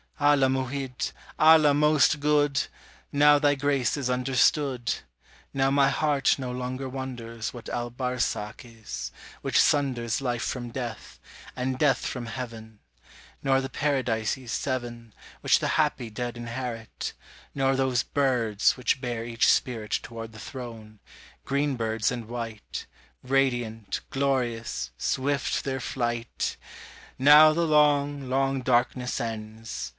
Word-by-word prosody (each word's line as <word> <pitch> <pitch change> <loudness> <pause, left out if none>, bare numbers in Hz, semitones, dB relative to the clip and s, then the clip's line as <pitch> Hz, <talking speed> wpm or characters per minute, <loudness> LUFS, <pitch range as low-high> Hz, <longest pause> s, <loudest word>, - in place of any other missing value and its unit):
Allah 145 -2 +4
Mu'hid, 130 0 -2 0.3
Allah 155 -2 +7
most 150 0 +4
good! 145 -1 +2 0.5
Now 145 0 +6
thy 145 -1 +3
grace 140 -1 0
is 135 -3 -2
understood: 125 0 +2 0.6
Now 135 0 +1
my 140 0 +4
heart 145 -2 +2
no 130 -2 -4
longer 125 +1 -4
wonders 120 -4 -5
What 120 - -8
Al 120 0 -3
Barsakh 125 -4 -2
is, 115 -3 -7 0.3
which - - +2
sunders 130 -5 +2
Life 120 -3 -1
from 120 -2 -3
death, 110 - -6 0.4
and 130 0 -2
death 135 -2 +2
from 120 -2 -4
heaven: 115 -3 -7 0.6
Nor 135 -1 +2
the 135 - -4
"Paradises 125 -4 -1
Seven" 120 -4 -3 0.3
Which - - +4
the - - -1
happy 115 -3 0
dead 120 +2 -4
inherit; 120 -1 -5 0.4
Nor 135 -1 +2
those 130 -3 +1
"birds" 120 -8 +1
which 125 +1 0
bear 120 -3 -3
each 115 0 +1
spirit 115 -4 -1
Toward 115 -1 -8
the 110 - -11
Throne, 115 -4 -9 0.5
"green 140 +1 0
birds 110 -1 0
and 120 -3 -5
white," 115 -3 -6 0.4
Radiant, 120 -5 0
glorious, 125 - -1
swift 140 +2 0
their 135 -1 -2
flight! 120 -2 -2 0.6
Now 150 +3 +8
the 170 +1 +1
long, 145 -2 +3
long 135 0 +1
darkness 125 0 +1
ends. 110 -1 -5
125 Hz, 125 wpm, -27 LUFS, 115-135 Hz, 0.6 s, Now